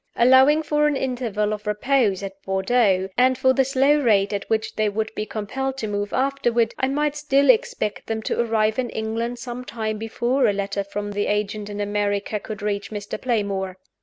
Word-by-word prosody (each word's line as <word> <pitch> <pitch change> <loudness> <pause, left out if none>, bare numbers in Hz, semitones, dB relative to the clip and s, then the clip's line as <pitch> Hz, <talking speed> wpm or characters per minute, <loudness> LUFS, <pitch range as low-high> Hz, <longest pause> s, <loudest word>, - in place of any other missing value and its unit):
Allowing 260 +5 +5
for 300 0 +2
an 295 - +1
interval 235 -6 -1
of 210 0 -7
repose 210 -2 +1
at 195 0 -7
Bordeaux, 190 0 +1
and 255 0 +4
for 260 0 +3
the 270 - +3
slow 275 +3 +3
rate 210 -6 +2
at 200 - -4
which 220 0 -1
they 215 -1 +1
would 220 +2 -3
be 215 - -4
compelled 265 +5 -3
to 225 - -3
move 205 0 -3
afterward, 240 -4 +1
I 260 - +2
might 295 +2 0
still 290 - +4
expect 480 - -2
them 220 -1 -3
to - - -2
arrive 220 -1 +1
in 245 -2 -1
England 225 +2 -3
some 240 +1 -6
time 220 -3 -4
before 240 +4 0
a 205 - +2
letter 200 0 -2
from 205 +1 -5
the 205 0 -1
agent 210 0 -2
in 205 0 -6
America 205 0 -1
could 215 0 -8
reach 200 -1 -2
Mr. 205 -1 -6
Playmore. 200 -6 -1
220 Hz, 190 wpm, -23 LUFS, 205-260 Hz, -, Allowing